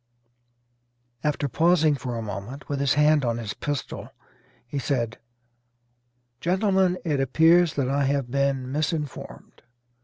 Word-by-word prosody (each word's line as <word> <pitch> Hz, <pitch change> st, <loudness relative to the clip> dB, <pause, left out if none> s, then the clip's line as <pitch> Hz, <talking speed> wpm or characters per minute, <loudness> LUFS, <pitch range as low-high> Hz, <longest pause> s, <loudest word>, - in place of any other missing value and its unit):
After 150 Hz, -1 st, 0 dB
pausing 160 Hz, +3 st, +3 dB
for 125 Hz, -3 st, -4 dB
a 115 Hz, -, -4 dB
moment, 105 Hz, +7 st, -7 dB
with 140 Hz, -1 st, -2 dB
his 140 Hz, -1 st, +2 dB
hand 150 Hz, 0 st, +4 dB
on 115 Hz, -2 st, 0 dB
his 110 Hz, -4 st, -4 dB
pistol, 145 Hz, -2 st, -5 dB, 0.6 s
he 140 Hz, +4 st, -4 dB
said, 120 Hz, -4 st, -2 dB, 1.2 s
"Gentlemen, 190 Hz, +1 st, +2 dB
it 150 Hz, -4 st, 0 dB
appears 160 Hz, +5 st, +4 dB
that 140 Hz, -3 st, 0 dB
I 140 Hz, +1 st, +1 dB
have 135 Hz, -3 st, -1 dB
been 135 Hz, -1 st, 0 dB
misinformed. 150 Hz, 0 st, -4 dB
140 Hz, 125 wpm, -25 LUFS, 130-155 Hz, 1.2 s, hand